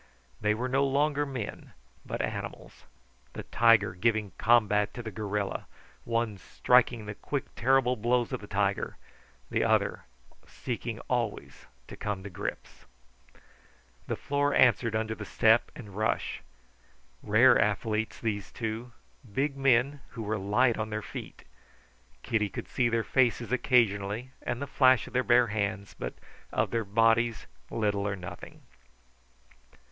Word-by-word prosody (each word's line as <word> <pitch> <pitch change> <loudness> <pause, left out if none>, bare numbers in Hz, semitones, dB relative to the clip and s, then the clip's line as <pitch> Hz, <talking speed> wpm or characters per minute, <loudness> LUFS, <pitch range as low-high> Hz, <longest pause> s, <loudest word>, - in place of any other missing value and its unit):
They 105 0 +2
were 125 +3 -2
no 135 +2 +2
longer 145 +1 +1
men, 130 -6 -6 0.3
but - - -3
animals; - - -6 0.5
the - - -6
tiger 115 -3 +4
giving 105 +1 0
combat 105 -3 +3
to 120 - -6
the 110 - -6
gorilla, 105 0 -3 0.4
one 115 -3 -1
striking 120 -1 +2
the 105 - -5
quick, 140 +6 -4
terrible 130 0 +3
blows 120 +1 0
of - - -3
the - - -10
tiger, - - -1 0.5
the - - +1
other - - +1 0.4
seeking 120 -2 -5
always 120 -4 -3 0.2
to - - -9
come 100 -2 -4
to 100 - -8
grips. 85 - -6 1.2
The - - -1
floor 145 0 0
answered 115 -2 +4
under 110 0 -1
the 110 - -7
step 110 +3 +3
and 105 - -10
rush. 110 +1 -1 0.8
Rare - - +5
athletes, 110 0 -1
these 105 -5 -3
two; 115 +2 -5 0.4
big 135 +6 0
men 135 +1 +2 0.2
who 115 - -3
were 110 0 -2
light 115 +5 +2
on 110 0 -2
their 105 0 -4
feet. - - -8 0.8
Kitty 105 -3 0
could - - -7
see 125 -2 +1
their 115 -1 +1
faces 120 -3 +1
occasionally 115 -2 +1
and 120 - -3
the 140 - -3
flash 130 -3 +4
of - - -12
their 125 - +3
bare 120 0 +5
hands, 100 -1 -2
but - - -6 0.4
of - - 0
their 115 -2 -1
bodies 115 +2 +2 0.2
little 105 -2 0
or 100 - -1
nothing. 90 -1 -10
115 Hz, 140 wpm, -29 LUFS, 105-125 Hz, 1.2 s, Rare